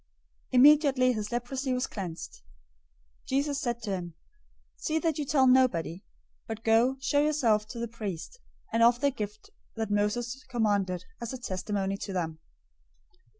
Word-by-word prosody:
Immediately 270 -1 +6
his 210 -2 -4
leprosy 255 +2 -2
was 250 0 0
cleansed. 175 - -7 0.8
008:004 - - -32
Jesus 280 +1 0
said 235 -2 -2
to 210 - -3
him, 175 -3 -4 0.6
"See 315 - -1
that 320 -2 0
you 295 - -1
tell 270 -1 +3
nobody, 230 -9 +3 0.4
but 225 0 -6
go, 230 +4 +3
show 285 +2 +2
yourself 240 -9 +2
to 235 - -8
the 235 0 -2
priest, 215 - -6 0.3
and 230 - +2
offer 240 +2 +5
the 285 -1 +3
gift 210 -4 -7 0.2
that 220 -2 -3
Moses 235 +6 -1
commanded, 200 -7 0 0.2
as 235 +1 -4
a - - -4
testimony 195 -3 -2
to 195 - -6
them." 165 -3 -3
235 Hz, 150 wpm, -29 LUFS, 205-265 Hz, 0.8 s, Immediately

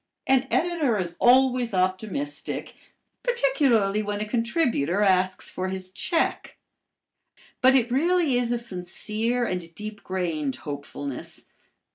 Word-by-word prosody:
An 265 0 +3
editor 325 -9 +1
is 175 -3 -3
always 250 -3 +4
optimistic, 205 +10 -2 0.5
particularly 270 - +2
when 205 -1 -3
a 210 - -2
contributor 230 - 0
asks 185 -1 +2
for 185 0 -3
his 185 -1 -3
check. 330 - -1 1.0
But 260 +1 +6
it 245 -2 +2
really 325 +1 +2
is 245 -1 +1
a 240 - +1
sincere 220 +3 -1
and 175 -5 -4
deep 210 0 -7
grained 165 -7 -2
hopefulness. 140 -1 -7
215 Hz, 115 wpm, -25 LUFS, 185-260 Hz, 1.0 s, But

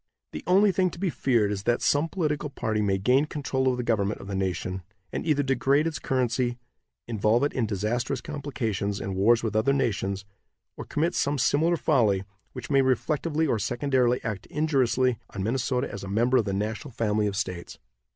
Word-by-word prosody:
The - - -7
only 195 +3 +5
thing 185 0 +2
to 170 - -11
be 190 -2 0
feared 115 -7 +1
is 100 -1 -3
that 120 +3 +1
some 145 +3 +2
political 150 -5 -1
party 110 -5 -2
may 100 -2 +1
gain 125 +9 +3
control 135 -3 -2
of 125 -1 +2
the 125 - -2
government 105 -3 0
of - - -9
the 100 - -6
nation, 95 -1 -2 0.3
and - - -3
either 145 -2 +2
degrade 135 +2 +2
its 165 -2 -2
currency, 125 -2 0 0.5
involve 110 +2 +2
it 145 - 0
in 120 -4 0
disastrous 110 +6 -1
complications 115 -9 -3
and 95 -1 -4
wars 115 +5 +4
with 110 -1 -2
other 125 +6 +3
nations, 100 -7 -1 0.5
or - - -7
commit 165 +4 0
some 145 +1 0
similar 155 +6 +2
folly 110 -12 +2 0.3
which - - -7
may 135 -1 +5
reflectively 150 +5 0
or 120 -7 +1
secondarily 125 +2 +1
act 110 -4 -4
injuriously 130 -5 +1 0.2
on 95 - -2
Minnesota 125 +3 0
as - - -7
a - - -6
member 120 +6 +2
of 115 - +2
the 100 - -2
national 110 +8 -3
family 105 -2 +1
of 100 - -3
states. 95 -3 -4
125 Hz, 190 wpm, -26 LUFS, 105-145 Hz, 0.5 s, only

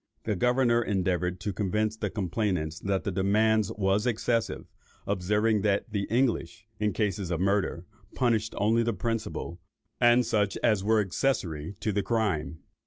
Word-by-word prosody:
The 105 - -1
governor 125 +3 +3
endeavoured 90 -3 -1
to 105 - -3
convince 105 +3 0
the 110 -2 -3
complainants 90 -5 -2
that 100 -1 -1
the 100 - -2
demand 105 +3 +2
was 100 +3 +1
excessive, 115 -1 -1 0.4
observing 105 +3 +1
that 105 +2 0
the 100 -2 -1
English, 110 -4 -1
in 105 0 +1
cases 100 -4 -1
of 85 -2 -1
murder, 95 -2 0 0.3
punished 110 -3 +1
only 110 +3 +3
the 115 0 0
principal, 110 -5 -3 0.4
and 120 0 +5
such 105 -2 0
as 105 -5 +3
were 110 +1 +3
accessary 95 - -2
to 110 - 0
the 100 0 0
crime. 95 -9 -1
105 Hz, 150 wpm, -28 LUFS, 95-110 Hz, 0.4 s, and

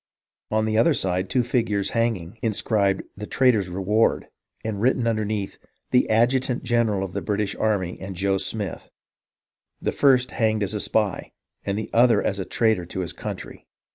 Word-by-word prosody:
On 110 0 +1
another 115 +9 +3
side, 90 0 -1
two 125 -2 +2
figures 115 -5 0
hanging, 115 -4 -1
inscribed, 105 -3 +1
' - - -48
The 105 +1 -6
Traitor's 115 -8 +2
Reward,' 95 +5 +1 0.4
and 105 -2 -3
written 125 0 +2
underneath, 110 -3 -2
* - - -47
The 125 - +3
Adjutant 125 +3 +2
general 115 -5 +1
of 95 -3 -6
the 100 - -2
British 105 0 -1
Army, 100 -5 -1
and 95 0 -6
Joe 95 +2 +1
Smith; 105 -4 -3 0.9
the - - -1
first 130 -3 +3
hanged 110 -2 +1
as 100 +1 -2
a 105 - -2
spy, 105 -2 -1 0.3
and 100 0 -2
the 110 - -5
other 120 +1 +5
as 100 - -1
a 95 - -3
traitor 110 -7 +1
to 95 - -4
his 85 - -3
country.' - - -8
110 Hz, 170 wpm, -24 LUFS, 95-115 Hz, 0.9 s, other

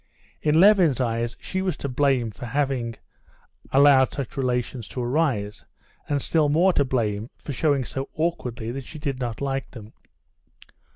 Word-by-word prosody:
In 155 +1 +3
Levin's 180 - +5
eyes 115 -1 -1
she 190 - -3
was 185 -5 -1
to - - -4
blame 130 -3 +1
for 120 +4 -8
having 130 -3 -1 0.8
allowed 135 -1 +6
such 135 -5 -5
relations 125 -3 -2
to 125 - -4
arise, 120 -7 -1 0.5
and 145 -2 0
still 155 -3 +2
more 175 +5 +4
to 145 - +3
blame 115 -4 -1
for 145 - -7
showing 140 -1 +1
so 135 +2 -5
awkwardly 125 -9 -2
that 135 +2 -5
she 155 - -10
did 140 -3 -3
not 120 -2 -4
like 135 -1 -2
them. 110 -3 -12
135 Hz, 160 wpm, -24 LUFS, 120-145 Hz, 0.8 s, allowed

